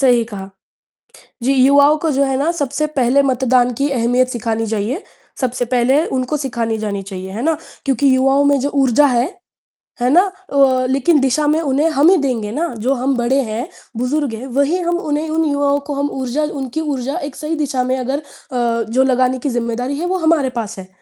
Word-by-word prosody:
सही 245 -4 +4
कहा। 200 -4 -8 0.9
जी, 270 +3 +2
युवाओं 280 +3 +5
को, 320 -1 -1
जो 275 0 +1
है 270 -1 0
ना, 300 +4 +1
सबसे 290 -1 -1
पहले 255 +3 +3
मतदान 255 -2 +2
की 280 +4 0
अहमियत 250 0 +1
सिखानी 225 -2 -2
चाहिए, 220 - -2 0.4
सबसे 250 -1 -1
पहले 255 +5 +2
उनको 260 +3 -2
सिखानी 235 -5 -2
जानी 200 -2 -3
चाहिए, 190 -1 -7
है 220 +5 -5
ना? 320 0 +1 0.3
क्योंकि 270 0 +2
युवाओं 270 +2 +3
में 285 0 +3
जो 280 - 0
ऊर्जा 275 +1 +4
है, 245 -1 +2 0.8
है 250 - +2
ना? 340 +6 +6 0.3
अ, 260 -2 +3
लेकिन 275 +4 +3
दिशा 270 +3 +1
में 305 +2 +2
उन्हें 295 +1 +1
हम 300 +3 +4
ही 380 - +5
देंगे 240 -7 -2
ना, 330 +7 -1
जो 250 +5 0
हम 265 +1 0
बड़े 245 +3 +1
हैं, 235 +8 -3 0.3
बुज़ुर्ग 260 +1 -1
हैं, 230 +4 -6
वही 280 +5 +2
हम 345 0 0
उन्हें 310 -1 -2
उन 320 0 +1
युवाओं 285 -1 +1
को 290 - -3
हम 285 +1 -1
ऊर्जा 260 +4 -1
उनकी 280 0 -3
ऊर्जा 275 -1 -3
एक 265 - -16
सही 310 +2 -3
दिशा 275 -4 -1
में 255 +1 -1
अगर 265 +2 -2
अ, 240 -5 -3
जो 255 +3 +3
लगाने 255 0 +1
की 280 - -2
ज़िम्मेदारी 245 +2 -2
है, 345 - -2
वो 370 +1 0
हमारे 320 -5 +2
पास 220 -1 -5
है। 185 - -9
265 Hz, 205 wpm, -17 LUFS, 245-290 Hz, 0.9 s, ना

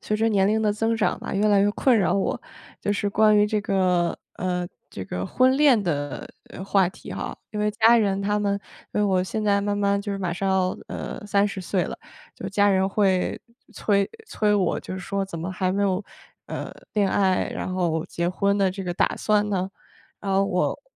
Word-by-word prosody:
随 215 - -1
着 225 +1 +1
年 195 -1 +3
龄 220 +1 +2
的 210 -1 +2
增 225 +2 0
长 220 - 0
吧， - - -5
越 205 +2 +2
来 205 -2 +4
越 205 +1 +3
困 255 +1 +3
扰 195 -4 +2
我， 195 - -1 0.4
就 205 - -1
是 205 0 -1
关 215 +1 +4
于 210 - +5
这 210 0 0
个 185 -4 +1 0.2
呃， 180 -1 -2 0.2
这 95 - -7
个 90 0 -4
婚 255 +1 +3
恋 280 -6 +5
的 145 -7 -3 0.4
话 195 -2 +3
题 185 - -10
哈。 - - -5
因 210 - -4
为 210 0 +2
家 230 +2 +5
人 200 -3 +1
他 205 +1 +1
们 200 -1 0 0.4
因 - - +1
为 - - +3
我 190 -3 +2
现 215 +3 -3
在 200 -1 +3
慢 205 0 -1
慢 200 0 +1
就 205 0 -5
是 200 - -2
马 185 -3 -2
上 195 +3 -2
要， 190 -1 +2 0.2
呃， - - -6
30 200 -1 +1
岁 185 +1 0
了， - - -6 0.4
就 - - -6
家 205 0 +3
人 190 0 +2
会 195 -2 +1 0.4
催 200 -2 +1 0.2
催 210 - +1
我， 195 -3 +1
就 - - -7
是 190 - -5
说 195 +1 -2
怎 190 -3 -6
么 175 +3 -4
还 185 0 0
没 200 +2 0
有， 190 0 +1 0.4
呃， - - -5 0.2
恋 205 -2 +3
爱， 190 -2 +1
然 185 - -4
后 170 -3 0
结 170 - -2
婚 200 +3 +1
的 195 -2 +2
这 195 +1 -6
个 175 -2 -3
打 - - +1
算 210 -1 +2
呢？ 190 -1 -1 0.5
然 195 -1 -3
后 195 +1 +3
我 180 -1 0
200 Hz, 230 characters per minute, -24 LUFS, 185-210 Hz, 0.5 s, 于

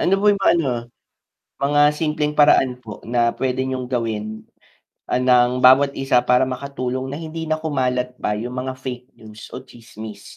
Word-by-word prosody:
Ano 185 - +1
po 210 - 0
yung 200 - -3
mga, - - +5
ano, 145 -5 0 0.9
mga 145 +1 +1 0.2
simpleng 150 -1 -1
paraan 135 -4 +4
po 105 -2 -9
na 120 -1 +2
pwede 130 0 -1
niyong 130 -1 -4
gawin, 110 -3 -3 0.6
ah, - - -1
ng 125 0 +3
bawat 140 +2 +6
isa 135 -2 +2
para 125 +1 +3
makatulong 130 0 -4
na 140 - -5
hindi 160 0 -6
na 155 - +1
kumalat 125 -4 -1
pa 105 - -1
yung 120 +4 -5 0.2
mga 130 - -3
fake 125 -1 -7
news 110 -1 -12
o 130 - -8
tsismis? 110 -4 -11
130 Hz, 175 wpm, -21 LUFS, 120-140 Hz, 0.9 s, bawat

